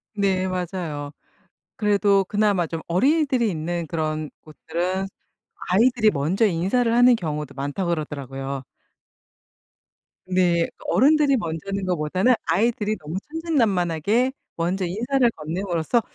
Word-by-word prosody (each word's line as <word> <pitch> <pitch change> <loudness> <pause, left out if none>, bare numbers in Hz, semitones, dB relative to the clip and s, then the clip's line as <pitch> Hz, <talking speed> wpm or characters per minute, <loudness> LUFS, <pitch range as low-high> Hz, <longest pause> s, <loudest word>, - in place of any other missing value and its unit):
네, 190 -2 +1
맞아요. 175 -5 -4 0.7
그래도 200 -2 +3
그나마 205 -3 +1
좀 165 0 -5
어린이들이 260 - +2
있는 170 +1 -3
그런 155 -1 -2
곳들은 175 +5 -3 0.6
'아이들이 220 +2 +4
먼저 170 +9 +1
인사를 200 +7 +1
하는 245 +1 +6
경우도 150 -6 -4
많다.' 145 +7 -3
그러더라고요. 140 -4 -4 1.7
네, 175 -2 +2 0.2
어른들이 290 0 +4
먼저 165 -5 -3
하는 195 -1 -2
것보다는 185 +7 +2
아이들이 215 +1 +1
너무 155 +4 -6
천진난만하게 230 - +1 0.2
먼저 180 +3 -1
인사를 240 +7 +1
건넴으로써 170 +6 -1
185 Hz, 295 characters per minute, -23 LUFS, 160-225 Hz, 1.7 s, 하는